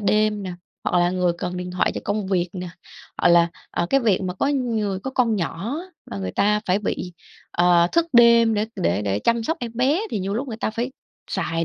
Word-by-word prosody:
đêm 210 0 +2
nè, 185 -2 -5 0.3
hoặc 180 - +2
là 175 0 +3
người 180 -1 +1
cần 180 0 -3
điện 180 0 -5
thoại 180 - 0
cho - - -3
công 205 0 -1
việc 180 -2 0
nè, 180 -1 -5 0.5
hoặc - - +4
là, 170 0 +5 0.2
ờ, 170 - -1
cái 275 - +4
việc 210 -6 +2
mà 180 -1 -3
có 190 - 0
người 225 -8 -1
có 265 - -4
con 240 -4 +1
nhỏ 190 - -3
á, 365 - -10 0.2
là 100 - -5
người 95 -1 -4
ta 210 +1 +2
phải 185 +2 +2
bị, 185 -3 -3 0.4
ờ, 175 -1 +4
thức 335 0 +3
đêm 235 -1 +6
để 210 +1 0
để 85 +5 0
để 100 -1 0
chăm 235 - +1
sóc 320 +7 -1
em 235 -2 -4
bé 265 +9 +2
thì - - -1
nhiều 195 +1 -2
lúc 260 +5 -3
người 225 - -5
ta 225 - -2
phải 235 +4 -3 0.4
xài 165 0 -1
205 Hz, 235 wpm, -23 LUFS, 180-235 Hz, 0.5 s, đêm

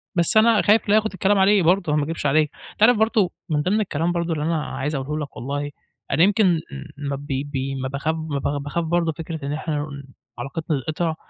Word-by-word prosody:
بس 170 +4 +3
أنا 220 -1 +5
خايف 210 0 +3
لياخد 215 +1 +3
الكلام 195 +2 +2
عليه 195 0 +4
برضو، 175 -2 +2
ما 150 - +2
أكدبش 165 +1 -4
عليك، 150 +1 +3 0.2
أنت - - -2
عارف 240 +1 +6
برضو 220 -3 +2 0.2
من 150 -2 +1
ضِمْن 200 +7 +1
الكلام 170 -3 -1
برضو 170 -1 -1
اللي 150 -2 -2
أنا 160 -1 0
عايز 150 +3 -3
أقوله 150 +3 -3
لك - - -21
والله، 145 +3 -3 0.4
أنا 150 +5 +4
يمكن 205 +2 +4
م 170 -3 +3 0.5
ما 140 - -1
ب 140 +1 -9
ب 140 +1 -2 0.2
ما 130 - -2
باخاف 140 +4 -2
ما 155 -3 -3
ب 140 +1 -2
باخاف 160 +4 -2
برضو 170 0 +1
فكرة 160 -2 -6
إن 145 - -2
إحنا 155 0 -3
ن 140 -1 -6 0.4
علاقتنا 140 +3 -3
تتقطع؛ 160 +1 -1
160 Hz, 220 wpm, -22 LUFS, 145-185 Hz, 0.5 s, عارف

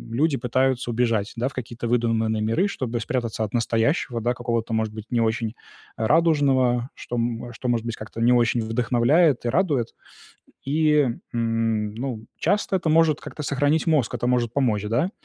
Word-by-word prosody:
люди 150 +3 +2
пытаются 130 +1 0
убежать, 115 -3 0
да, 120 +2 0
в - - -16
какие-то 120 -1 -5
выдуманные 115 -2 +1
миры, 115 - +1
чтобы 125 - -3
спрятаться 115 -1 -2
от 100 - -9
настоящего, 115 +2 0
да, 120 +2 +1
какого-то, 115 -2 -2
может 110 -1 -1
быть, 110 -1 -8
не 120 -1 +2
очень 115 0 -1 0.4
радужного, 130 -3 +2
что 120 - -6 0.4
что, 125 - -6
м - - +3
может 115 -1 -1
быть, 115 -1 -3
как-то 110 +1 -9
не 120 +2 +5
очень 120 -1 +2
вдохновляет 120 +6 +2
и - - +1
радует. 145 -7 +1 0.8
И, 150 0 +3 0.3
м, 115 -2 0
ну, 120 -2 -5
часто 195 +2 +1
это 170 -3 -2
может 160 -1 +3
как-то 150 - -8
сохранить 145 +3 +1
мозг, 150 -8 +2
это 120 0 -2
может 120 -2 +1
помочь, 120 -7 +1
да. 120 - 0
120 Hz, 170 wpm, -24 LUFS, 115-140 Hz, 0.8 s, не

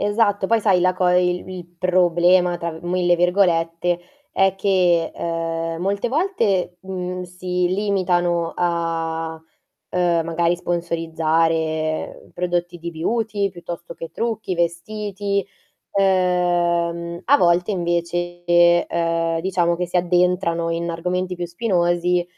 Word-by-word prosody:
Esatto. 205 -1 +1
Poi 230 +1 +2
sai 195 -4 +3
la 185 +1 +3
co 185 -1 +1
e 180 0 +4
il 180 +1 -3
"il 180 -2 -7
problema", 180 0 +3
tra 170 0 -3
1000 175 0 +1
virgolette, 175 -1 +1 0.3
è 195 -1 +2
che, 180 -4 +2
ehm, 165 0 -3
molte 200 +4 0
volte, 230 - 0
uhm, 180 -1 -4
si 180 0 -2
limitano 175 -3 0
a, 165 -2 -2 0.5
ehm, 175 -2 +1
magari 170 +1 +1
sponsorizzare 165 -2 -1
prodotti 175 0 -2
di 170 +1 -6
beauty 205 +4 -1
piuttosto 175 -1 -8
che 165 -1 -8
trucchi, 220 -3 -2
vestiti, 200 +3 -2 0.5
ehm, 175 -3 +1
a 285 +4 +5
volte 175 +1 +2
invece, 175 0 -2 0.4
ehm, 165 -1 0
diciamo 175 -1 +1
che 180 +1 -2
si 180 - -1
addentrano 175 -1 +1
in 170 +1 -2
argomenti 180 +2 -2
più 175 0 -4
spinosi, 175 -2 +1
175 Hz, 120 wpm, -21 LUFS, 170-185 Hz, 0.5 s, a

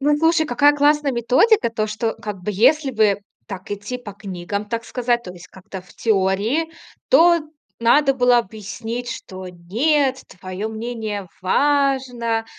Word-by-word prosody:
ну, 295 +2 +3
и - - 0
слушай, 325 0 +3
какая 290 +3 +4
классная 290 -1 +2
методика. 250 - +3
То, 215 -1 -2
что, 220 +1 -2
как 205 -4 -7
бы, 210 - -2
если 270 +7 +3
бы 215 -4 +2 0.3
так 190 0 -8
идти 205 +5 -5
по 210 -5 -9
книгам, 200 0 -5
так 230 -1 -3
сказать, 240 -1 -1
то 180 - -8
есть 180 0 -14
как-то 190 0 -10
в 180 - -20
теории, 220 +9 0 0.4
то 340 -6 +5 0.4
надо 270 +4 +4
было 245 -1 +4
объяснить, 225 +3 -5
что: 185 -4 -8
"Нет, 260 - 0 0.2
твое 185 +3 -5
мнение 220 -4 -5
важно, 260 -2 +1
230 Hz, 155 wpm, -21 LUFS, 205-275 Hz, 0.4 s, то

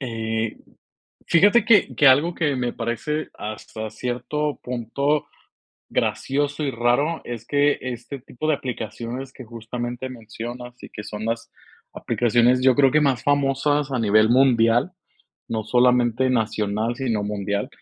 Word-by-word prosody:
Eh, 115 -3 -3 0.7
fíjate 205 +7 +5
que 220 -3 +4
que 145 - +4
algo 150 +6 +5
que 145 -5 0
me 125 -1 -1
parece, 120 +7 -3
hasta 110 0 -7
cierto 125 +6 -3
punto, 135 +5 -1 0.6
gracioso 145 +2 -1
y 140 - 0
raro, 125 +8 +1
es 115 -2 -7
que 145 +2 +2
este 130 +2 -6
tipo 135 +4 -6
de 155 - +3
aplicaciones 120 +2 -6
que 130 - -10
justamente 120 +2 -6
mencionas, 120 +1 -8
y - - -9
que 105 - -8
son 105 +1 -6
las 115 +1 -3 0.4
aplicaciones, 120 +2 +2
yo 130 -1 +5
creo 135 -2 +4
que 150 - +3
más 135 -4 +1
famosas 145 0 +1
a 125 - 0
nivel 110 0 +4
mundial, 120 +2 +4 0.6
no 110 -1 -2
solamente 125 +1 +3
nacional, 110 0 -1
sino 115 -6 -1
mundial, 100 0 -2
125 Hz, 140 wpm, -23 LUFS, 115-140 Hz, 0.7 s, fíjate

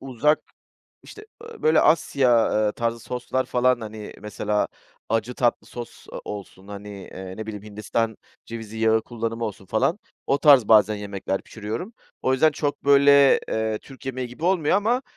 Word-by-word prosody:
uzak, 135 +4 +1 0.6
işte, 425 0 -12 0.2
ııı, 465 0 -12
böyle, 155 0 +5
Asya, 130 -7 +3
eee, 105 - 0
tarzı 115 +1 -2
soslar 125 +2 -2
falan, 125 0 +2
hani, 110 -1 -8
mesela 105 0 -1 0.4
acı 115 +2 -1
tatlı 120 -1 0
sos, 120 -1 -9
ııı, - - -6
olsun, 100 -1 -8
hani, 100 0 -8
eee, 95 -2 -9
ne 110 - -6
bileyim, 105 -2 -6
Hindistan 105 +1 -2 0.3
cevizi 110 -1 -7
yağı 110 0 +3
kullanımı 115 0 -4
olsun 100 -3 -6
falan 110 - +1 0.3
o 140 - +2
tarz 140 -8 +6
bazen 110 -1 +6
yemekler 100 -2 -4
pişiriyorum. 110 - -6 0.3
O 130 - +2
yüzden, 145 +4 +4
çok, 145 0 -3
böyle, 140 0 +6
eee, 110 -1 -1
Türk 135 +2 -14
yemeği 130 -1 -3
gibi 125 +7 -8
olmuyor 180 -3 +3
ama, 230 +5 +1
115 Hz, 160 wpm, -24 LUFS, 105-140 Hz, 0.6 s, tarz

